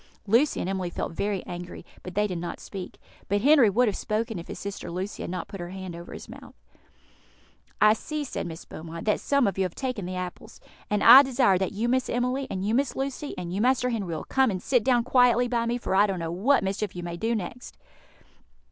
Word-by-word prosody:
Lucy 235 Hz, +8 st, +3 dB
and -, -, -2 dB
Emily 190 Hz, -2 st, -2 dB
felt -, -, -4 dB
very 200 Hz, +3 st, -2 dB
angry, 175 Hz, 0 st, -8 dB, 0.2 s
but 180 Hz, -, -9 dB
they 210 Hz, +1 st, +2 dB
did 180 Hz, -4 st, -3 dB
not 170 Hz, 0 st, -5 dB
speak; 190 Hz, -3 st, -8 dB, 0.3 s
but 205 Hz, +1 st, +1 dB
Henry 275 Hz, -3 st, +6 dB
would 240 Hz, +5 st, +3 dB
have 210 Hz, -, 0 dB
spoken 215 Hz, -2 st, -2 dB
if 170 Hz, -, -9 dB
his -, -, -7 dB
sister 200 Hz, 0 st, -6 dB
Lucy 185 Hz, +4 st, -5 dB
had -, -, -4 dB
not 180 Hz, +1 st, -4 dB
put 200 Hz, -1 st, -9 dB
her 175 Hz, 0 st, -6 dB
hand 185 Hz, -2 st, -7 dB
on 170 Hz, +1 st, -9 dB
his -, -, -9 dB
mouth. -, -, -12 dB, 1.2 s
"I 215 Hz, 0 st, +6 dB
see," 305 Hz, +6 st, -4 dB
said 260 Hz, -, -4 dB
Miss 165 Hz, -1 st, -8 dB
Beaumont, 165 Hz, +1 st, -8 dB
"that 210 Hz, -, +2 dB
some 280 Hz, -2 st, +2 dB
of 195 Hz, -2 st, -1 dB
you -, -, +3 dB
have 180 Hz, -2 st, -3 dB
taken 250 Hz, -9 st, -3 dB
the 185 Hz, -, -4 dB
apples, 180 Hz, -1 st, -7 dB, 0.3 s
and 210 Hz, -1 st, +1 dB
I 250 Hz, +4 st, +11 dB
desire 250 Hz, -8 st, +2 dB
that 190 Hz, +1 st, -1 dB
you 220 Hz, +4 st, -1 dB
Miss 255 Hz, +1 st, +1 dB
Emily, 250 Hz, +3 st, -1 dB
and 190 Hz, 0 st, -3 dB
you 215 Hz, -, 0 dB
Miss 270 Hz, +2 st, +1 dB
Lucy, 275 Hz, +2 st, -4 dB
and 175 Hz, 0 st, -5 dB
you 200 Hz, -, -1 dB
Master 250 Hz, +1 st, +2 dB
Henry, 215 Hz, -5 st, -2 dB
will -, -, -5 dB
come 265 Hz, -1 st, +2 dB
and 190 Hz, -3 st, -2 dB
sit 245 Hz, +4 st, +1 dB
down 245 Hz, -1 st, +3 dB
quietly 245 Hz, -1 st, +4 dB
by 235 Hz, -1 st, 0 dB
me, 240 Hz, +1 st, 0 dB
for 235 Hz, -, -3 dB
I 200 Hz, +2 st, +5 dB
don't 195 Hz, -2 st, -2 dB
know 165 Hz, -1 st, -3 dB
what 215 Hz, +9 st, +2 dB
mischief 195 Hz, +1 st, -2 dB
you 175 Hz, -, -5 dB
may 170 Hz, 0 st, -5 dB
do 225 Hz, +7 st, -1 dB
next." 225 Hz, +4 st, -6 dB
210 Hz, 235 wpm, -26 LUFS, 185-245 Hz, 1.2 s, I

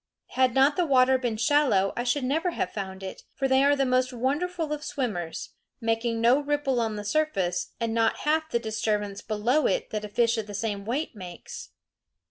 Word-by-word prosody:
Had 255 Hz, -2 st, +2 dB
not 275 Hz, +2 st, +4 dB
the 355 Hz, -, +2 dB
water 260 Hz, -1 st, +4 dB
been 240 Hz, -4 st, -2 dB
shallow 225 Hz, -5 st, +3 dB
I 240 Hz, -, -1 dB
should 255 Hz, +3 st, +1 dB
never 315 Hz, +8 st, 0 dB
have -, -, -2 dB
found 195 Hz, -2 st, -6 dB
it; 190 Hz, -, -7 dB
for 270 Hz, -1 st, 0 dB
they 265 Hz, 0 st, +4 dB
are 285 Hz, +1 st, +4 dB
the 275 Hz, -1 st, +1 dB
most 255 Hz, 0 st, +2 dB
wonderful 300 Hz, +6 st, -1 dB
of 300 Hz, 0 st, -5 dB
swimmers, 205 Hz, -, -3 dB, 0.3 s
making 230 Hz, 0 st, 0 dB
no 240 Hz, +4 st, +5 dB
ripple 290 Hz, -3 st, 0 dB
on 220 Hz, -2 st, -1 dB
the 205 Hz, 0 st, -6 dB
surface, 200 Hz, -, 0 dB
and 230 Hz, -1 st, -1 dB
not 225 Hz, -1 st, +1 dB
half 315 Hz, +1 st, +1 dB
the 270 Hz, -, +1 dB
disturbance 215 Hz, -3 st, -2 dB
below 225 Hz, +8 st, +1 dB
it -, -, -1 dB
that 215 Hz, -1 st, -3 dB
a 210 Hz, -, -6 dB
fish 230 Hz, +1 st, +2 dB
of 215 Hz, -, -5 dB
the 205 Hz, -, -7 dB
same 200 Hz, -1 st, -3 dB
weight 260 Hz, +5 st, -2 dB
makes. 180 Hz, -4 st, -9 dB
240 Hz, 200 wpm, -26 LUFS, 215-285 Hz, 0.3 s, no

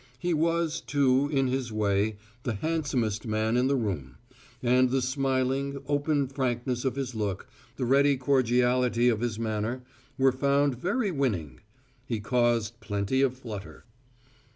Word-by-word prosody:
He 175 Hz, +7 st, -1 dB
was, 165 Hz, 0 st, 0 dB
too, 140 Hz, -1 st, +2 dB
in 135 Hz, -2 st, +2 dB
his 130 Hz, -2 st, -1 dB
way, 105 Hz, 0 st, +1 dB, 0.3 s
the 120 Hz, -2 st, -2 dB
handsomest 125 Hz, -7 st, -1 dB
man 110 Hz, +1 st, 0 dB
in 125 Hz, +1 st, +3 dB
the 140 Hz, -, +2 dB
room; 85 Hz, -, -3 dB, 0.5 s
and 125 Hz, +1 st, +4 dB
the 135 Hz, +2 st, +1 dB
smiling, 135 Hz, +1 st, 0 dB
open 145 Hz, 0 st, +1 dB
frankness 125 Hz, -2 st, -2 dB
of 130 Hz, -, 0 dB
his 135 Hz, -2 st, -3 dB
look, 105 Hz, -4 st, -3 dB, 0.3 s
the 130 Hz, -, -2 dB
ready 140 Hz, +2 st, +4 dB
cordiality 125 Hz, -2 st, +2 dB
of 110 Hz, -2 st, 0 dB
his 120 Hz, -3 st, -1 dB
manner, 110 Hz, +2 st, -2 dB, 0.3 s
were 135 Hz, 0 st, +4 dB
found 140 Hz, 0 st, +1 dB
very 205 Hz, -, 0 dB
winning. 95 Hz, -, -2 dB, 0.5 s
He 115 Hz, -, -2 dB
caused 115 Hz, 0 st, +1 dB
plenty 105 Hz, +3 st, -1 dB
of 130 Hz, -2 st, +1 dB
flutter. 105 Hz, -6 st, -8 dB
125 Hz, 145 wpm, -28 LUFS, 110-140 Hz, 0.5 s, and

